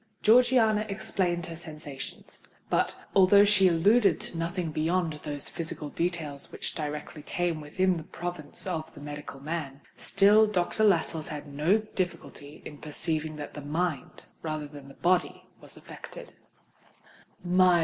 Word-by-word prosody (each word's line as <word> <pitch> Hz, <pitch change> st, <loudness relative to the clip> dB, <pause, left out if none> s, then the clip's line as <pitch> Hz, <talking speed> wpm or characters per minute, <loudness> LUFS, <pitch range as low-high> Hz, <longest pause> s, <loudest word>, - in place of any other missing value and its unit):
Georgiana 225 Hz, -2 st, +5 dB
explained 190 Hz, -4 st, -1 dB
her 165 Hz, -, -7 dB
sensations; 155 Hz, -4 st, -8 dB, 0.3 s
but, -, -, +2 dB, 0.2 s
although 200 Hz, +1 st, +7 dB
she 195 Hz, -2 st, +5 dB
alluded 195 Hz, +2 st, +4 dB
to -, -, -6 dB
nothing 170 Hz, 0 st, -2 dB
beyond 165 Hz, +2 st, 0 dB
those 145 Hz, -2 st, -4 dB
physical 160 Hz, -2 st, -5 dB
details 160 Hz, -4 st, -3 dB
which -, -, -4 dB
directly 150 Hz, 0 st, -5 dB
came 170 Hz, +1 st, -1 dB
within 185 Hz, +5 st, +1 dB
the 160 Hz, -, -6 dB
province 175 Hz, -2 st, -6 dB
of 165 Hz, -4 st, -3 dB
the -, -, -10 dB
medical 145 Hz, -1 st, -7 dB
man, 145 Hz, -2 st, -4 dB, 0.2 s
still 205 Hz, +2 st, +5 dB
Dr. 210 Hz, +1 st, 0 dB
Lascelles 165 Hz, -5 st, +2 dB
had 150 Hz, -1 st, -6 dB
no 150 Hz, +8 st, +2 dB
difficulty 180 Hz, -8 st, -5 dB
in 145 Hz, -, -9 dB
perceiving 155 Hz, +1 st, -2 dB
that 150 Hz, -1 st, -7 dB
the 150 Hz, -, -7 dB
mind, 155 Hz, 0 st, -2 dB, 0.2 s
rather 155 Hz, -2 st, -3 dB
than 145 Hz, -2 st, -11 dB
the 140 Hz, -, -13 dB
body, 180 Hz, +1 st, +1 dB, 0.2 s
was -, -, -8 dB
affected. -, -, -10 dB
165 Hz, 140 wpm, -28 LUFS, 150-185 Hz, 0.3 s, although